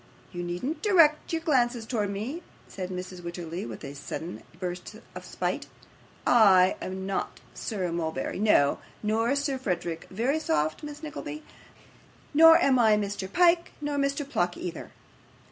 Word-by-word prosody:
You 175 - -5
needn't 180 - -3
direct 330 -8 +4
your 325 -1 -1
glances 245 -7 +1
towards 215 -4 -1
me,' 235 - -4 0.3
said 185 -2 -6
Mrs. 185 0 -6
Wititterly, 170 -3 -5
with 110 - -8
a 140 - -6
sudden 160 +4 -6 0.2
burst 180 +2 -5 0.2
of - - -8
spite; - - -3 0.6
'I 190 -6 +6
am 190 0 -5
not 195 0 -3
Sir 190 -6 -3
Mulberry, 160 -2 -3
no, 195 -10 +4 0.2
nor 220 +2 +1
Lord 280 -2 -1
Frederick 175 -6 -3
Verisopht, 190 - 0
Miss 295 +1 -8
Nickleby, 305 0 -6 0.9
nor 325 +2 +9
am 260 -2 +3
I 220 -3 +5
Mr. 200 -2 -3
Pyke, 345 -1 +3
nor 295 -1 -2
Mr. 280 0 0
Pluck 175 -10 -1
either. 175 -2 -6
210 Hz, 145 wpm, -27 LUFS, 180-290 Hz, 0.9 s, nor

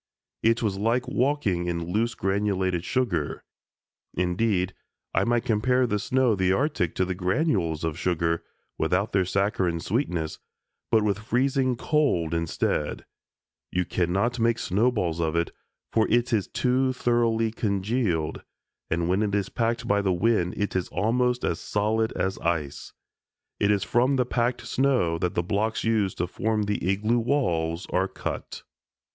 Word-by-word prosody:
It 115 +1 +2
was 100 -3 -1
like 120 +4 +1
walking 125 -10 0
in 85 0 -2
loose 115 +4 0
granulated 95 -3 0
sugar. 130 +5 -1 0.7
Indeed 90 +1 +1 0.4
I - - +2
might 120 0 +1
compare 125 +4 +2
the 105 -3 0
snow 130 +2 +2
of 100 - 0
the 95 0 +3
Arctic 95 - 0
to 95 - +1
the 95 - -2
granules 90 - 0
of 80 0 -2
sugar, 85 -2 0 0.4
without 90 +6 +1
their 95 -2 +2
saccharine 95 -3 0
sweetness, 90 - -2 0.5
but 110 -2 +4
with 105 -1 0
freezing 130 +3 +1
cold 115 - +1
instead; 85 -1 -1 0.7
you 90 0 0
cannot 95 +8 0
make 115 0 +2
snowballs 95 -5 0
of 80 -1 0
it, 85 0 0 0.4
for 110 -1 +3
it 120 +1 +2
is 105 -4 +1
too 130 +1 +1
thoroughly 115 -2 +1
congealed, 100 -6 -1 0.5
and 85 +1 0
when 95 +3 +2
it 105 -1 0
is 100 -2 -1
packed 115 0 -1
by 100 0 +3
the 95 -2 +1
wind 90 -1 +1
it 100 -1 -2
is 90 -2 0
almost 125 +4 0
as 85 - -1
solid 110 +2 0
as 95 0 -2
ice. 80 -4 -2 0.7
It 100 - +2
is 100 -2 +2
from 125 +6 +2
the 125 -2 +2
packed 120 0 -1
snow 125 -12 +1
that 90 0 -1
the 85 - +1
blocks 105 +5 -1
used 110 -4 +1
to 90 - 0
form 110 +4 -1
the 105 0 -2
igloo 110 +5 +2
walls 90 - 0
are 95 +1 +2
cut. - - -6
105 Hz, 155 wpm, -26 LUFS, 90-120 Hz, 0.7 s, but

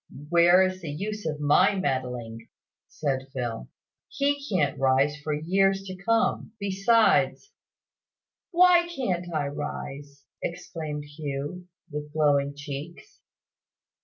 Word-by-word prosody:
"Where 175 +2 +6
is 185 0 -3
the 165 - -6
use 205 +6 -4
of 150 -1 -3
my 165 +7 +4
meddling?" 125 -9 -3 0.4
said 135 -3 -2
Phil. 120 - -4 0.4
"He 285 0 0
can't 150 -8 +1
rise 135 +2 +3
for 155 - -2
years 195 +6 +1
to 190 -1 -7
come. 225 +2 0
Besides 205 - +2 0.5
" - - -67
"Why 350 -1 +6
can't 185 - -3
I 155 -3 -1
rise?" 140 0 -6 0.2
exclaimed 155 -3 -5
Hugh, 145 +4 -6 0.2
with 150 0 -6
glowing 145 -2 +2
cheeks. 145 +3 -8
155 Hz, 115 wpm, -26 LUFS, 140-195 Hz, 0.5 s, Where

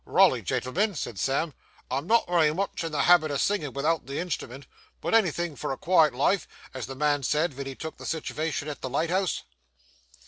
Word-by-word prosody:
'Raly, - - +4
gentlemen,' 195 +11 -1
said 120 -8 -4
Sam, 140 - 0 0.4
'I'm 135 +5 -2
not 230 +2 +4
wery 170 -4 +3
much 195 -2 -2
in 165 - -3
the 150 - +1
habit 175 -3 +5
o' 140 - -1
singin' 155 -9 0
without 155 +3 0
the 140 - -4
instrument; 140 -6 -4 0.3
but - - -3
anythin' 175 -7 +2
for - - -4
a 135 - -3
quiet 160 -6 +4
life, 155 +7 +1 0.3
as 130 -3 -5
the 135 - -7
man 145 +1 +1
said 150 +2 0
wen 140 0 -5
he 135 - -6
took 160 +3 -7
the - - -10
sitivation 155 -1 -2
at 150 - -6
the 130 - -4
lighthouse. 170 +7 0
155 Hz, 200 wpm, -27 LUFS, 140-175 Hz, 0.4 s, habit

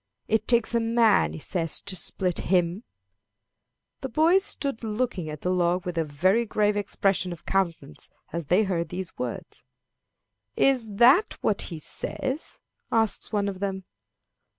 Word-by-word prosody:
It 220 -1 +1
takes 235 -1 +2
a 235 - +3
man, 225 - +3
he - - -6
says, 165 - -2
to 200 - -4
split 180 -1 0
him." 180 +3 +2 1.2
The - - -5
boys 340 +5 +4
stood 275 - -4
looking 215 -6 -2
at 150 -1 -7
the 180 - 0
log 180 0 +1
with 180 -1 -3
a 165 - +1
very 185 +10 +2
grave 210 -2 +1
expression 195 -2 0
of 170 - -9
countenance 170 - -2 0.2
as 170 -3 -3
they 185 +7 +4
heard 170 -5 -1
these 180 0 -6
words. - - -6 0.9
"Is 240 -6 +2
that 260 - +5
what 205 - +1
he 165 - -6
says?" 265 - -3 0.3
asked 225 -2 +1
one 205 -2 0
of 195 -2 -4
them. 190 -1 -3
195 Hz, 150 wpm, -26 LUFS, 175-230 Hz, 1.2 s, that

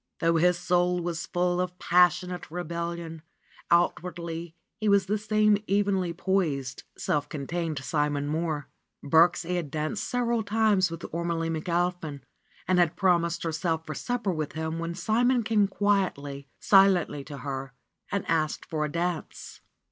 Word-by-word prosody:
Though 165 0 +2
his 180 +2 +3
soul 180 0 +1
was 170 -2 -3
full 180 0 +1
of 180 0 -4
passionate 180 0 +2
rebellion, 170 -1 -4 0.5
out 170 +1 +3
wardly 170 -1 -6 0.2
he 215 -1 +1
was 200 -1 +4
the 210 +2 0
same 215 0 +3
evenly 195 -3 +1
poised, 165 -7 -1
self 145 0 -1
contained 155 +2 -3
Simon 145 +1 -1
Mohr. 155 -1 -2 0.4
Birksie 170 +3 +3
had 165 -5 -3
danced 155 +7 -2
several 235 -2 0
times 210 -3 +2
with 165 0 -7
Ormelie 165 -1 -1
Mc 160 +2 -4
Alpin 170 -4 -1 0.4
and 185 -1 +3
had 170 -2 +3
promised 170 -2 +2
herself 160 0 -1
for 155 - -5
supper 240 - -2
with 155 -3 -3
him 160 +1 -3
when 170 0 -3
Simon 240 +4 +2
came 210 -2 +3
quietly, 185 -9 -1
silently 190 -7 +4
to 145 - -8
her 135 -1 -5 0.4
and 200 - -1
asked 155 -2 0
for 155 -2 -2
a 150 - -2
dance. 170 0 -4
170 Hz, 150 wpm, -27 LUFS, 160-185 Hz, 0.5 s, was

